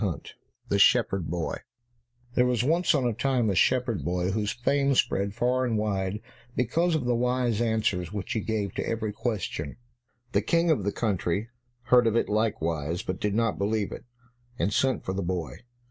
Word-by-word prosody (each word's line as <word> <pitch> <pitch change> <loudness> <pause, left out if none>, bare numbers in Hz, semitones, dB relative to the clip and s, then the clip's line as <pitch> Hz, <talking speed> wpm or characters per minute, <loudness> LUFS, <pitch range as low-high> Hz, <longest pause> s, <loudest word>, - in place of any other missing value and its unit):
152 90 -9 -3 0.3
The 100 - +2
Shepherd 100 -5 +4
Boy 85 0 -2 0.8
There 125 0 +3
was 125 -2 +1
once 165 +4 +3
on 135 -3 +1
a 120 - +1
time 120 -2 +1
a - - -1
shepherd 120 - +2
boy 90 +4 0
whose 105 0 -1
fame 140 +3 +1
spread 100 -3 +1
far 125 +2 +1
and 120 -3 0
wide 100 -1 -1 0.3
because 165 +8 +1
of 145 -5 -1
the 125 - +2
wise 125 -2 +1
answers 110 -6 0
which 105 -3 -4
he 110 - 0
gave 105 -3 -2
to - - -3
every 110 -2 -2
question. 100 - -3 0.5
The 100 - +2
King 170 +8 +2
of 115 -11 +1
the 100 - +1
country 100 -1 -1 0.3
heard 120 -1 +5
of 115 - +1
it 115 - +1
likewise, 85 -7 -1
but 95 0 -4
did 105 -1 0
not 115 -1 +1
believe 105 0 0
it, - - -8 0.5
and 105 - 0
sent 135 -1 +1
for 95 - -2
the 95 - -2
boy. 85 -3 -3
110 Hz, 185 wpm, -27 LUFS, 95-125 Hz, 0.8 s, heard